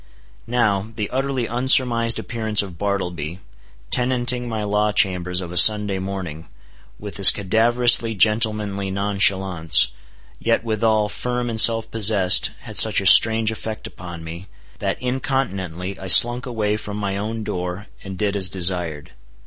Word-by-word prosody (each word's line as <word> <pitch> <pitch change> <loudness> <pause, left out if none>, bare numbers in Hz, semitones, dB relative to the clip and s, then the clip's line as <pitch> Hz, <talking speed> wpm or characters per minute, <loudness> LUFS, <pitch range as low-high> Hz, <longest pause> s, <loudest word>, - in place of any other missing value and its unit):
Now, 110 -4 -1
the 105 -2 -6
utterly 135 -1 -3
unsurmised 120 -1 +1
appearance 110 -3 -3
of 90 -4 -12
Bartleby, 90 -5 -5 0.5
tenanting 125 -1 0
my 110 -2 -5
law 105 +1 -1
chambers 90 -3 0
of 85 -2 -9
a 90 - -4
Sunday 105 -2 +5
morning, 90 -5 -8 0.5
with 105 -1 -8
his 100 - +8
cadaverously 115 +3 +1
gentlemanly 105 -1 -1
nonchalance, 95 -6 +1 0.5
yet 115 -1 -2
withal 110 -1 -1
firm 125 +2 -5
and 110 -1 +4
self 115 -1 +3
possessed, 100 -4 +3
had - - -10
such - - +5
a - - -7
strange 110 0 +5
effect 110 0 -8
upon 85 -2 -11
me, 85 +4 -10 0.3
that - - -4
incontinently 100 - -5
I 95 - -9
slunk 120 +7 +6
away 105 -3 -3
from 105 -1 -9
my 100 -2 -5
own 110 +2 -6
door, 90 +1 -6 0.2
and 95 -1 -9
did 105 +1 -3
as 95 -3 0
desired. 85 -5 -3
105 Hz, 140 wpm, -19 LUFS, 95-115 Hz, 0.5 s, his